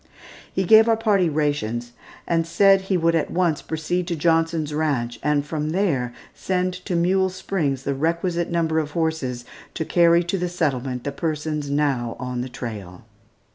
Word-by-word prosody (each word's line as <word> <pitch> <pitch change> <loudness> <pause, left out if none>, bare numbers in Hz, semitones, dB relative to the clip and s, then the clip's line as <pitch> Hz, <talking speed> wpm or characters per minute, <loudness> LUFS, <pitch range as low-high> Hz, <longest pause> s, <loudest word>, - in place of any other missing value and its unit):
He 190 - 0
gave 220 +4 +6
our 225 - +3
party 205 -6 +2
rations, 140 -6 -1 0.4
and 165 -1 +1
said 195 +3 +5
that 190 - -12
he 190 - +2
would 165 0 +2
at 165 - 0
once 170 -4 +1
proceed 170 +3 -2
to 175 - -1
Johnson's 165 -1 +1
Ranch 130 -7 -1
and 145 0 +1
from 150 0 -3
there 155 -9 0 0.2
send 185 -1 -1
to 180 - -2
Mule 190 +2 +2
Springs 165 -8 -2
the 140 - -1
requisite 170 +4 -1
number 160 -2 +1
of 150 -1 -4
horses 160 -7 -2 0.3
to 160 - -2
carry 170 0 +4
to 175 +3 -2
the 180 0 -1
settlement 135 -7 -2
the 140 - -3
persons 150 0 -3
now 140 -5 0
on 125 -1 -3
the 130 - -5
trail. 105 -8 -7
160 Hz, 175 wpm, -23 LUFS, 140-175 Hz, 0.4 s, gave